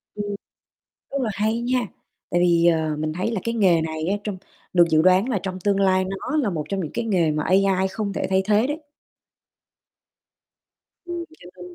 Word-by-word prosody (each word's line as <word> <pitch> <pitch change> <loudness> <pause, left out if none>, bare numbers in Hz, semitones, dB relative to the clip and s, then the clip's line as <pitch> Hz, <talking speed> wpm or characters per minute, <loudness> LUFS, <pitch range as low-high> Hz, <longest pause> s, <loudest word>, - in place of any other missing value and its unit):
Ừm. 205 -1 -3 0.8
Rất 275 - -1
là 235 - 0
hay 215 +3 0
nha, 250 +1 +1 0.5
tại 175 - +2
vì, 170 -1 +4
ờ, 160 -2 +2
mình 155 0 -2
thấy 185 +7 -2
là 210 - -2
cái 230 - -1
nghề 180 -6 +4
này 160 0 -3
á, 200 - +1
trong 205 -3 -4 0.4
được 175 -1 +6
dự 155 -1 +4
đoán 185 +7 +4
là 220 -6 0
trong 185 -1 -4
tương 200 +1 +1
lai 185 -1 +3
nó 195 +11 -3
là 245 -9 +1
một 155 -4 -3
trong 195 - -1
những 155 - -5
cái 235 - -2
nghề 175 -7 +2
mà 150 0 -1
AI 190 +1 +2
không 200 0 -3
thể - - -2
thay 190 0 +2
thế 210 +4 +3
đấy. 295 +3 -4 2.2
Ừm, 345 -1 -5
cho 175 - -13
nên 180 -1 -11
190 Hz, 205 wpm, -23 LUFS, 175-215 Hz, 2.2 s, được